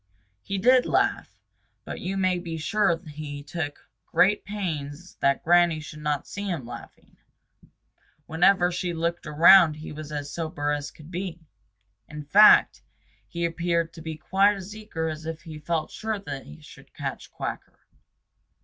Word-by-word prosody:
He 195 - -4
did 250 +6 +4
laugh, - - 0 0.5
but - - -6
you 195 +2 -3
may 185 -2 +1
be 170 -2 -5
sure 195 +2 +1
he 145 -1 -7
took 145 -1 -5 0.2
great 205 +3 +3
pains 175 -5 -5
that 140 0 +1
Granny 175 -1 +4
should 155 0 -10
not 150 -1 -1
see 200 +1 -6
him 160 -9 -3
laughing. 120 0 -12 1.1
Whenever 180 +2 +3
she 175 -1 -3
looked 170 0 -2
around 160 +2 +7
he 155 +1 -9
was 150 0 -8
as 145 -1 -5
sober 155 -3 -2
as 145 -1 -2
could 155 +2 -15
be. 175 -2 -5 0.6
In 150 0 -7
fact, 205 +9 +6 0.5
he 170 0 -3
appeared 170 0 -1
to 165 - -11
be 160 -1 -6
quite 195 +6 +3
as 195 +2 -8
eager 210 -7 -4
as 155 0 -5
if 165 +1 -6
he 160 -3 -9
felt 155 +1 -2
sure 220 0 -3
they 135 - -9
would - - -19
catch - - -5
Quacker. - - -6
165 Hz, 155 wpm, -25 LUFS, 150-185 Hz, 1.1 s, around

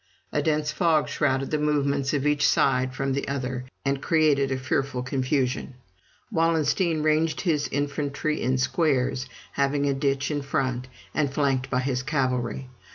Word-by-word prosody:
A - - +1
dense 150 -1 0
fog 155 -2 +2
shrouded 135 -1 0
the 155 - +1
movements 140 -2 +1
of 145 -1 0
each 150 -1 +3
side 130 -1 +2
from 135 0 -1
the 140 - -2
other, 130 -2 -3 0.2
and 135 0 0
created 150 -5 +3
a 130 - 0
fearful 130 0 -1
confusion. 130 -1 -1 0.6
Wallenstein 165 -1 +1
ranged 155 0 +2
his 155 -5 +1
infantry 145 +1 -1
in 130 +1 +1
squares, 130 -2 +1 0.2
having 140 +1 +1
a 140 - +2
ditch 140 +1 0
in 145 -1 -1
front, 130 -3 -1 0.3
and 145 -3 +1
flanked 135 -2 0
by 130 -1 +1
his 130 -1 -1
cavalry. 130 -2 -1
140 Hz, 155 wpm, -25 LUFS, 130-150 Hz, 0.6 s, each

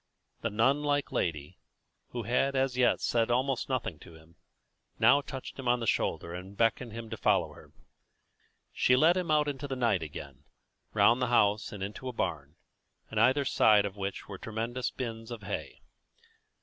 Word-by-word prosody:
The - - -1
nun 130 +7 +2
like 145 -1 0
lady, 75 -4 -2 0.5
who 120 -1 -5
had 135 +4 +1
as 130 -1 +1
yet 125 -1 +3
said 115 -1 +1
almost 130 +2 0
nothing 120 - -2
to 85 - -14
him, 80 +1 -18 0.6
now 140 - +5
touched 135 0 -8
him 130 - -5
on 120 0 +3
the 115 - -3
shoulder 85 -5 -1
and 95 +3 -8
beckoned 115 +2 +1
him 115 0 -8
to 110 - -4
follow - - +1
her. - - -16 1.0
She 125 - +3
led 160 +7 +5
him 180 -3 -2
out 150 -1 +3
into 145 0 -4
the 135 - -3
night 115 -8 +1
again, 70 -2 -9 0.5
round 120 +2 +5
the 125 - +2
house 105 -3 +2
and 100 -2 -6
into 105 +6 -6
a 130 - -4
barn, 75 -8 -3 0.6
in 110 - -1
either 130 +5 +4
side 105 -5 +4
of 100 -1 -5
which 100 -1 -5
were 100 -2 -8
tremendous 115 +3 -3
bins 115 -3 -6
of 115 -3 -7
hay. 100 +1 -5
115 Hz, 180 wpm, -30 LUFS, 100-130 Hz, 1.0 s, now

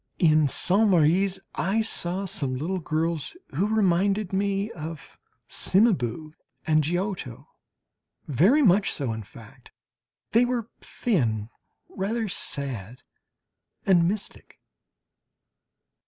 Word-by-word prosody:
In 155 -3 +4
Saintes 200 +10 +3
Maries 185 +3 +3
I 210 +4 0
saw 195 -3 -1
some 140 -8 -2
little 175 +8 -2
girls 160 - -2 0.2
who 185 +9 +1
reminded 200 -1 +1
me 200 +2 0
of 155 -3 -9 0.3
Cimabue 155 - +1 0.3
and 155 -1 +3
Giotto 175 - -3 0.8
very 195 - +4
much 200 -2 +4
so, 130 -6 -3
in 110 - -5
fact; 105 - -15 0.6
they 230 +2 +4
were 240 -2 -2
thin, 115 - -1 0.4
rather 220 +4 -3
sad, 130 - -3 0.8
and 175 -3 +4
mystic. 200 +2 -5
180 Hz, 100 wpm, -25 LUFS, 150-200 Hz, 0.8 s, In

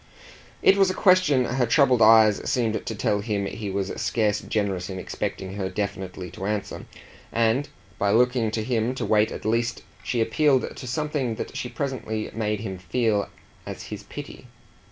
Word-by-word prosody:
It 195 - +6
was 195 -1 +5
a 185 - -2
question 180 -9 +4
her 125 0 0
troubled 125 -1 +4
eyes 110 -1 +6
seemed 115 -3 0
to 110 - -3
tell 105 0 0
him 100 -2 -1
he 105 +1 -5
was 95 0 -2
scarce 105 -3 +1
generous 100 -4 -2
in 95 - -5
expecting 95 0 -4
her 95 -2 -2
definitely 95 -2 -4
to 95 - -5
answer, 105 -1 -3 0.4
and 115 +5 +1 0.3
by 100 - +2
looking 120 +1 +3
to 110 0 -2
him 120 +1 0
to - - -3
wait 105 0 +3
at - - -7
least 115 +2 0 0.2
she 120 - -1
appealed 130 +4 +2
to 130 - -8
something 140 -3 -1
that - - -6
she 125 - -3
presently 125 -7 -3
made 105 -1 -1
him 95 -4 -5
feel 105 +2 0 0.4
as - - -6
his - - -6
pity. - - -9
110 Hz, 175 wpm, -25 LUFS, 100-125 Hz, 0.4 s, It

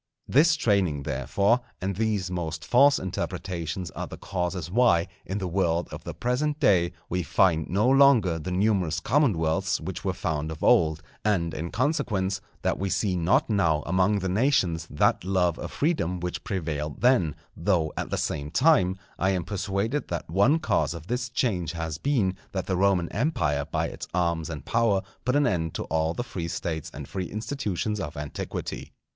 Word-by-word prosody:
This 160 +5 +5
training, 95 - +1
therefore, 70 - +1 0.2
and 95 +1 -2
these 105 -3 -1
most 80 -3 -4
false 140 +3 +5
interpretations 90 -2 -4
are - - -5
the - - -9
causes 90 -3 -3
why, 105 -6 +4 0.2
in 95 - -2
the 95 -2 -2
world 85 -2 0
of - - -8
the - - -6
present 145 +5 -1
day, 90 - +3
we 90 +1 -1
find 85 -2 +2
no 100 +6 +2
longer 130 -11 +5
the 80 - -5
numerous 90 -4 +1
commonwealths 105 - +1
which - - -6
were - - 0
found 80 0 -2
of 80 - -7
old; 80 -1 +4 0.2
and 85 -6 +1
in 85 +3 -4
consequence, 105 - 0 0.2
that - - 0
we 95 +1 -1
see 95 -1 0
not 85 +2 +2
now 85 -8 +2
among 95 +4 +2
the 95 -1 -2
nations 95 - +1
that 75 - +2
love 90 -3 +1
of - - -5
freedom 115 - 0
which 90 0 -4
prevailed 75 -6 -3
then; 120 - +3 0.2
though, 80 -3 +1
at - - -3
the - - -1
same 70 0 -2
time, 95 - +3 0.2
I 95 - +2
am 95 -3 0
persuaded 100 - -2
that 85 - -4
one 100 - +4
cause 85 - 0
of 80 -1 -9
this 125 +4 -2
change 100 - -1
has 80 -2 -4
been, 115 -10 +1 0.2
that 95 -2 -2
the 95 - -1
Roman 95 -2 +2
Empire 80 - 0
by - - -1
its - - -8
arms 85 -2 0
and 75 -4 -6
power 115 -5 +2 0.2
put 125 +1 +1
an 145 0 +4
end 80 -6 -1
to - - -2
all 80 +1 0
the 120 - -2
free 85 -8 -5
States 80 -1 -3
and 70 -1 -8
free 95 -2 -4
institutions 105 -3 -3
of 75 -6 -5
antiquity. 75 0 -5
95 Hz, 180 wpm, -26 LUFS, 80-110 Hz, 0.2 s, This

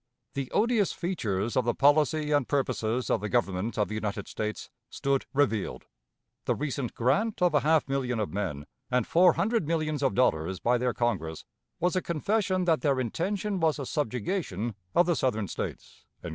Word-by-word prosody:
"The 140 -2 -3
odious 220 -3 +2
features 110 - -2
of 130 - +3
the 120 0 0
policy 150 +1 +3
and 145 -4 +2
purposes 125 -3 0
of - - +1
the 105 - -3
Government 105 -2 0
of 105 - +2
the - - -6
United 105 -1 -3
States 105 0 -4 0.2
stood 140 -1 -1
revealed; 135 -7 0 0.6
the - - +1
recent 140 -4 -3
grant 145 - +1
of 180 -3 +3
a 150 - +5
half 155 +1 +2
million 130 -4 -1
of 105 - -2
men 85 -8 -3 0.2
and 125 -2 +1
four 175 0 +5
hundred 220 -6 0
millions 155 -3 -1
of 135 -2 +1
dollars 95 -7 +1
by 120 +4 +2
their 125 -1 0
Congress, 90 -10 -2 0.3
was 180 +1 +1
a 185 - +2
confession 185 +3 0
that 165 -3 +2
their 140 -3 +2
intention 190 - -2
was 160 -2 +2
a 140 - -4
subjugation 120 - -2 0.2
of 175 - +6
the 175 -1 +2
Southern 110 -7 0
States." - - -6
135 Hz, 175 wpm, -28 LUFS, 110-165 Hz, 0.6 s, of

